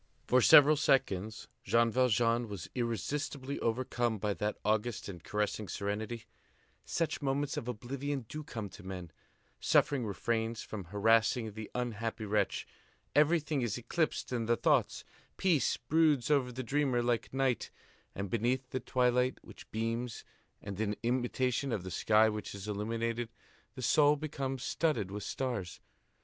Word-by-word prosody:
For 125 Hz, 0 st, +4 dB
several 145 Hz, +5 st, +8 dB
seconds, 110 Hz, -8 st, +1 dB, 0.2 s
Jean 115 Hz, 0 st, +3 dB
Valjean 120 Hz, -1 st, +2 dB
was 100 Hz, -5 st, -6 dB
irresistibly 130 Hz, -, -2 dB
overcome 120 Hz, -1 st, 0 dB
by 105 Hz, 0 st, -1 dB
that 105 Hz, +2 st, -2 dB
august 110 Hz, +2 st, 0 dB
and 90 Hz, -4 st, -8 dB
caressing 105 Hz, 0 st, -2 dB
serenity; 110 Hz, +4 st, -3 dB, 0.6 s
such 165 Hz, -2 st, -1 dB
moments 140 Hz, +1 st, 0 dB
of 120 Hz, -, -4 dB
oblivion 130 Hz, +3 st, -3 dB
do 155 Hz, +5 st, -6 dB
come 110 Hz, -7 st, -5 dB
to 105 Hz, -, -12 dB
men; 90 Hz, -3 st, -7 dB, 0.5 s
suffering 140 Hz, -4 st, +3 dB
refrains 110 Hz, +3 st, -1 dB
from 100 Hz, -4 st, -6 dB
harassing 110 Hz, +4 st, +2 dB
the 110 Hz, 0 st, -7 dB
unhappy 115 Hz, -2 st, -3 dB
wretch; 105 Hz, -1 st, 0 dB, 0.5 s
everything 150 Hz, -1 st, +3 dB
is 120 Hz, -3 st, -1 dB
eclipsed 150 Hz, +3 st, -1 dB
in 115 Hz, -2 st, -1 dB
the 120 Hz, 0 st, +3 dB
thoughts; -, -, +2 dB, 0.3 s
peace 170 Hz, -7 st, +2 dB
broods 150 Hz, -1 st, +2 dB
over 135 Hz, -4 st, +3 dB
the 130 Hz, +2 st, -5 dB
dreamer 130 Hz, -1 st, +1 dB
like 120 Hz, -1 st, 0 dB
night; 135 Hz, -2 st, 0 dB, 0.5 s
and, 100 Hz, -1 st, -4 dB
beneath 125 Hz, +3 st, 0 dB
the 130 Hz, -, -1 dB
twilight 125 Hz, 0 st, +2 dB
which -, -, -13 dB
beams 115 Hz, +1 st, -3 dB, 0.4 s
and 100 Hz, 0 st, -5 dB
in 105 Hz, -1 st, 0 dB
imitation 125 Hz, +2 st, 0 dB
of 105 Hz, -6 st, -2 dB
the 95 Hz, -, -6 dB
sky 110 Hz, +4 st, +4 dB
which 105 Hz, -1 st, -4 dB
is 100 Hz, +1 st, -7 dB
illuminated, 115 Hz, +3 st, -2 dB, 0.5 s
the 130 Hz, -, -6 dB
soul 145 Hz, +4 st, +5 dB
becomes 135 Hz, -3 st, -4 dB
studded 150 Hz, -, 0 dB
with 105 Hz, +1 st, -4 dB
stars. 110 Hz, -5 st, -3 dB
120 Hz, 145 wpm, -32 LUFS, 105-130 Hz, 0.6 s, several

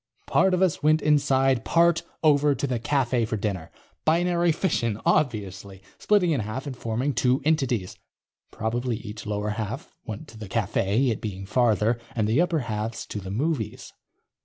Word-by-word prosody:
Part 190 Hz, -1 st, +3 dB
of 180 Hz, -, +2 dB
us 180 Hz, -4 st, +1 dB
went 155 Hz, +1 st, +3 dB
inside, 135 Hz, -4 st, +3 dB
part 170 Hz, +3 st, +3 dB, 0.2 s
over 145 Hz, -2 st, +4 dB
to 135 Hz, -, -2 dB
the 125 Hz, -3 st, -1 dB
cafe 125 Hz, -2 st, +1 dB
for 110 Hz, 0 st, -2 dB
dinner._ 95 Hz, -6 st, -3 dB, 0.3 s
Binary 175 Hz, +1 st, +2 dB
fission, 120 Hz, -, 0 dB
obviously. 100 Hz, -8 st, -1 dB, 0.2 s
Splitting 200 Hz, -5 st, +3 dB
in 145 Hz, -, +1 dB
half 110 Hz, +6 st, -4 dB
and 140 Hz, -3 st, -5 dB
forming 125 Hz, +4 st, -2 dB
two 130 Hz, +1 st, +2 dB
entities. 130 Hz, -11 st, 0 dB, 0.5 s
Probably 120 Hz, +1 st, -2 dB
each 110 Hz, -1 st, -8 dB
lower 105 Hz, 0 st, -2 dB
half 110 Hz, +6 st, -5 dB
went 110 Hz, +7 st, -7 dB
to 110 Hz, -, -13 dB
the 105 Hz, -3 st, -8 dB
cafe, 110 Hz, +3 st, +1 dB
it 110 Hz, -, -4 dB
being 95 Hz, -3 st, -5 dB
farther, 110 Hz, +1 st, +2 dB, 0.2 s
and 110 Hz, -3 st, +1 dB
the 115 Hz, +9 st, +3 dB
upper 175 Hz, -3 st, +1 dB
halves 110 Hz, 0 st, -4 dB
to 105 Hz, -, -5 dB
the 95 Hz, -1 st, -8 dB
movies. 125 Hz, 0 st, -2 dB
120 Hz, 165 wpm, -25 LUFS, 105-150 Hz, 0.5 s, over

